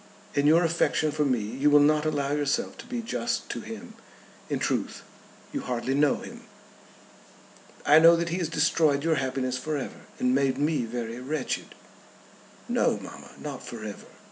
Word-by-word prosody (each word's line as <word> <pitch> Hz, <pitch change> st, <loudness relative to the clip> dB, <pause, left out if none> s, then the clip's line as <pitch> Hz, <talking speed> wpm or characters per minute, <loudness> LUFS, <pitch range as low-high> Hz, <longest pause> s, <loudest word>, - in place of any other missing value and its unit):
In 145 Hz, 0 st, +2 dB
your 165 Hz, +3 st, +6 dB
affection 165 Hz, -2 st, +1 dB
for 150 Hz, 0 st, 0 dB
me 130 Hz, -3 st, +2 dB
you 130 Hz, +8 st, +1 dB
will 145 Hz, 0 st, +7 dB
not 150 Hz, +1 st, +3 dB
allow 145 Hz, -2 st, -1 dB
yourself 145 Hz, +10 st, 0 dB
to -, -, -10 dB
be 240 Hz, -2 st, -4 dB
just 230 Hz, 0 st, -2 dB
to -, -, -4 dB
him. 225 Hz, +1 st, -9 dB, 0.6 s
In -, -, 0 dB
truth -, -, -2 dB, 0.5 s
you 285 Hz, -, -2 dB
hardly 125 Hz, -, -2 dB
know 145 Hz, 0 st, +3 dB
him." -, -, -9 dB, 1.4 s
"I 150 Hz, +2 st, +7 dB
know 165 Hz, +1 st, +8 dB
that 170 Hz, 0 st, -1 dB
he 175 Hz, +2 st, -2 dB
has 170 Hz, -3 st, -1 dB
destroyed 150 Hz, -2 st, +2 dB
your 160 Hz, -1 st, +2 dB
happiness 130 Hz, -1 st, -2 dB
for 155 Hz, +1 st, -2 dB
ever, 135 Hz, -, -7 dB
and 125 Hz, 0 st, +1 dB
made 135 Hz, -1 st, +2 dB
me 150 Hz, -3 st, +1 dB
very 115 Hz, 0 st, -5 dB
wretched." 135 Hz, +1 st, -3 dB, 0.9 s
"No, -, -, +2 dB
mamma; -, -, -11 dB
not 140 Hz, -4 st, -6 dB
for 115 Hz, -2 st, -8 dB
ever. 105 Hz, -, -8 dB
145 Hz, 170 wpm, -27 LUFS, 130-165 Hz, 1.4 s, know